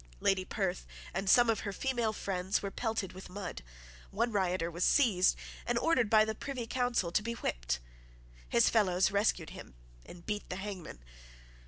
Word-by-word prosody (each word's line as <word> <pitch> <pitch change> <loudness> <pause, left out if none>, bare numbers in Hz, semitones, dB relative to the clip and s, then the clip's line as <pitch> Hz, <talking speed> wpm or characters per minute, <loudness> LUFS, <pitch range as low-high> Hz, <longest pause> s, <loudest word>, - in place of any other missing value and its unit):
Lady 190 - +2
Perth 185 -2 -2 0.3
and 195 +1 -1
some 240 +4 +7
of 225 -2 +2
her 200 - -4
female 240 0 0
friends 190 -2 -2
were 200 - -3
pelted 220 -5 -2
with 185 0 -10
mud. 185 - -6 0.5
One 230 +4 0
rioter 185 -4 0
was 175 +2 -2
seized, 210 -10 +4 0.3
and 240 - 0
ordered 255 -5 +2
by 215 0 +6
the 220 - -2
Privy 255 +1 -5
Council 240 -7 0
to 210 - +2
be 230 +2 -3
whipped. - - -2 0.7
His 115 - +4
fellows 190 -4 +3
rescued 200 -5 +1
him 65 - -11 0.3
and 175 -1 -13
beat 210 -1 -3
the 180 - -3
hangman. 190 - -7
200 Hz, 170 wpm, -32 LUFS, 180-225 Hz, 0.7 s, some